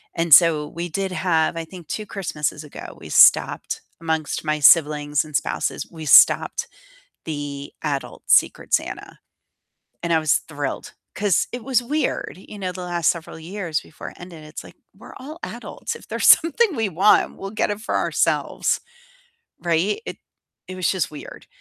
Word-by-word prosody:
And 165 -1 -1
so 155 -3 +6
we 170 +1 -6
did 190 +3 -3
have 165 -2 0
I 165 - -4
think 175 -2 -12
2 215 - -4
Christmases 155 -6 -4
ago, 150 - -10
we - - -11
stopped - - +4 0.2
amongst 160 -1 -2
my 155 0 0
siblings 150 -1 +4
and 155 -1 -9
spouses, - - -2
we 160 -2 -9
stopped 470 - +5 0.6
the 145 -2 -6
adult 145 -3 -4
Secret - - +3
Santa. - - -3 0.8
And 170 0 -1
I 160 - +4
was 155 -2 +2
thrilled, 145 -3 -6 0.2
'cause 205 -5 +1
it 245 -1 -5
was 255 -3 +1
weird, 295 -3 -2
you 205 +2 -12
know, 185 -2 -3
the 180 0 -7
last 175 -2 +1
several 165 -1 -6
years 170 -1 -4
before - - -10
it - - -17
ended, 170 -3 -11
it's 155 0 -9
like - - -15 0.2
"We're - - -13
all 300 +5 -9
adults, - - -6
if - - -15
there's - - -1
something 340 +4 +5
we 225 -2 0
want, 190 +4 +3
we'll 195 - -7
get 215 - -1
it 205 +1 -4
for 230 - -2
ourselves." - - 0 0.8
Right, 170 - 0
it - - -6 0.5
it 185 - -7
was 185 -1 0
just 185 -5 -2
weird. 150 - -11
170 Hz, 170 wpm, -22 LUFS, 155-195 Hz, 0.8 s, so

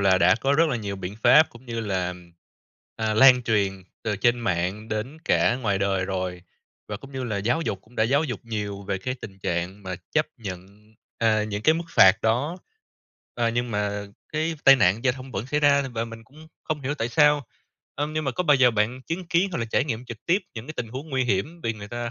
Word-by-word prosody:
là 95 -2 +4
đã 90 +4 +5
có 135 +4 0
rất 160 +2 +4
là 125 - 0
nhiều 100 -3 -4
biện 95 +2 -6
pháp, 155 +1 +7
cũng 120 +2 -16
như 115 -1 -3
là, 95 -4 -2 0.8
à, 110 -1 -1
lan 125 +2 +7
truyền 100 -4 0 0.2
từ 105 -3 -1
trên 120 +4 +2
mạng 95 +2 -2
đến 110 +9 -4
cả 120 - +3
ngoài 105 -6 0
đời 95 -1 0
rồi, 90 -2 -3 0.5
và 105 - -4
cũng 135 +5 -13
như 130 -1 -4
là 110 -4 -2
giáo 120 +10 0
dục, 100 -11 -2
cũng 120 +3 -22
đã 110 - +3
giáo 140 +6 +2
dục 125 -8 -4
nhiều 105 -3 -4
về 95 -1 -3
cái 125 +7 -3
tình 100 -6 -11
trạng 90 +3 -3
mà 95 -1 -4 0.2
chấp - - +2
nhận, 95 -4 -7 0.5
à, 110 -2 +2
những 105 0 -4
cái 155 +6 +5
mức 170 +1 -3
phạt 95 - +7
đó, 130 +10 +1 0.8
ờ, 120 -1 +1
nhưng 120 +1 -1
mà 105 -1 -2 0.3
cái 160 +2 -1
tai 135 0 +9
nạn 105 +2 +2
giao 130 - +4
thông 130 0 -10
vẫn 100 +6 -3
xảy 150 +2 0
ra 140 -1 +4
và 115 0 -2
mình 115 -1 -10
cũng 155 +5 -16 0.2
không 155 -2 -2
hiểu 140 +2 -2
tại 115 -4 -2
sao. 150 0 +3 0.5
Ưm, 145 +2 -2
nhưng 155 -1 -2
mà 135 - 0
có 180 - -1
bao 150 - +5
giờ 125 -1 +5
bạn 115 +4 -1
chứng 170 +4 -5
kiến, 180 +3 +2
hoặc - - -2
là 115 - -1
trải 115 +4 +1
nghiệm 120 -3 -4
trực 115 -3 -10
tiếp 180 +4 +4 0.2
những 115 +3 -7
cái 155 - -7
tình 115 -2 -3
huống 135 +7 -7
nguy 130 -1 +1
hiểm 125 - -1
vì 115 - 0
người 105 -1 -10
ta 120 0 -4
115 Hz, 240 wpm, -25 LUFS, 100-135 Hz, 0.8 s, tai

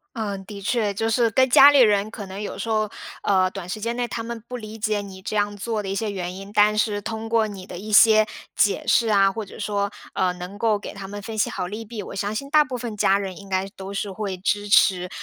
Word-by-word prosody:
嗯， 200 -3 -4
的 200 0 -9
确。 210 0 0
就 225 +3 -1
是 230 0 +3
跟 260 +3 +3
家 280 +3 +9
里 285 - +5
人 210 -3 +4
可 210 -2 -7
能 190 +1 -7
有 210 - -5
时 230 - -4
候， 215 -1 +1 0.4
呃， 185 -2 +3
短 190 -2 -8
时 210 +3 -5
间 235 +2 -2
内 245 0 -1
他 230 - -4
们 235 0 -6
不 250 - -5
理 215 -1 -9
解 215 -1 0
你 190 -2 -10
这 215 - -4
样 205 0 0
做 220 +1 -2
的 195 - -6
一 195 - -2
些 210 +1 -2
原 180 -2 -4
因， 195 +1 -9
但 210 0 +4
是 210 -1 0
通 220 +1 -5
过 225 -1 +2
你 195 -3 -8
的 180 - -8
一 215 +3 -7
些 215 0 +6 0.3
解 205 - +2
释 230 -2 +3
啊， 195 -2 +4
或 220 +1 -5
者 190 - -12
说， 200 -1 -1 0.2
呃， 185 -1 +1
能 180 +3 -8
够 220 -1 +2
给 200 - -8
他 195 -1 -8
们 205 +1 -7
分 225 +2 -7
析 - - +2
好 185 - -3
利 210 +4 -6
弊， 220 -1 -7
我 - - -8
相 200 +2 -2
信 275 +5 -4
大 305 0 +6
部 260 -4 -5
分 235 -3 -5
家 195 -1 +3
人 190 -3 -5
应 200 -1 -12
该 190 0 0
都 190 0 -8
是 200 0 -3
会 195 -1 -4
支 205 +2 -1
持， 180 -2 +4
205 Hz, 290 characters per minute, -23 LUFS, 195-225 Hz, 0.4 s, 家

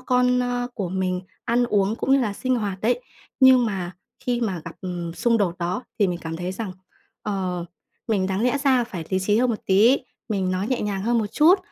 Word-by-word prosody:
con, 250 0 +2
ơ, 245 0 -1
của 195 -6 -3
mình 185 0 -1 0.2
ăn 245 +1 +2
uống 205 -1 +1
cũng 270 - 0
như 275 - +5
là 215 -5 0
sinh 255 +4 0
hoạt 200 -4 -3
đấy, 245 - +1 0.4
nhưng 260 -2 +7
mà 185 -4 -3 0.3
khi 245 -1 -1
mà 195 -8 -1
gặp, 165 - -7
ừm, 175 -3 -4
xung 230 +2 +2
đột 180 -4 0
đó 180 +6 -2 0.2
thì 205 - +4
mình 175 -1 -2
cảm 165 0 -4
thấy 180 +2 -3
rằng, 200 -1 -5 0.5
ờ, 185 -4 -2 0.4
mình 200 -4 +1
đáng 190 +1 -1
lẽ 250 +3 +2
ra 260 -3 +4
phải 190 -9 -6
lý 190 - +2
trí 205 +2 +2
hơn 250 0 +3
một 220 - 0
tí, 215 +8 +5 0.3
mình 190 -3 0
nói 185 +2 -1
nhẹ 255 - 0
nhàng 200 -2 -2
hơn 235 +2 +2
một 220 - 0
chút, 340 +6 +6
210 Hz, 225 wpm, -24 LUFS, 185-245 Hz, 0.5 s, nhưng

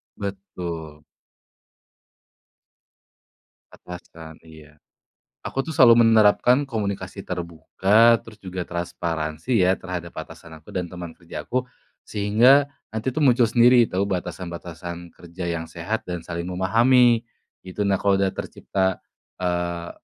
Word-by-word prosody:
Betul. 85 -6 -7 2.7
Atasan, 80 -2 -12
iya. 75 -2 -16 0.6
Aku 135 - -3
tuh 160 - -5
selalu 120 -3 +7
menerapkan 115 +5 +4
komunikasi 100 -4 -4
terbuka, 95 +6 +2
terus 115 - -14
juga 95 -1 -5
transparansi 85 +3 -2
ya 95 +1 +4
terhadap 90 -2 -6
atasan 85 -1 -11
aku 75 - -19
dan 90 -1 -1
teman 85 -2 -8
kerja 85 -2 -8
aku, 130 0 0 0.4
sehingga 120 +8 +4 0.3
nanti 110 +4 -2
tuh 155 - +1
muncul 125 -2 +4
sendiri 120 +1 +5
tahu 95 +2 0
batasan-batasan 85 -2 -6
kerja 85 +1 -7
yang 80 -1 -3
sehat 85 +7 -4
dan 90 -1 -4
saling 85 +1 -5
memahami. 115 +6 +3 0.4
Gitu, 95 +3 -6
nah 100 - +3
kalau 100 0 +2
sudah 95 - +2
tercipta, 95 -1 -2 0.4
eee, 85 -1 -2
95 Hz, 115 wpm, -23 LUFS, 85-110 Hz, 2.7 s, selalu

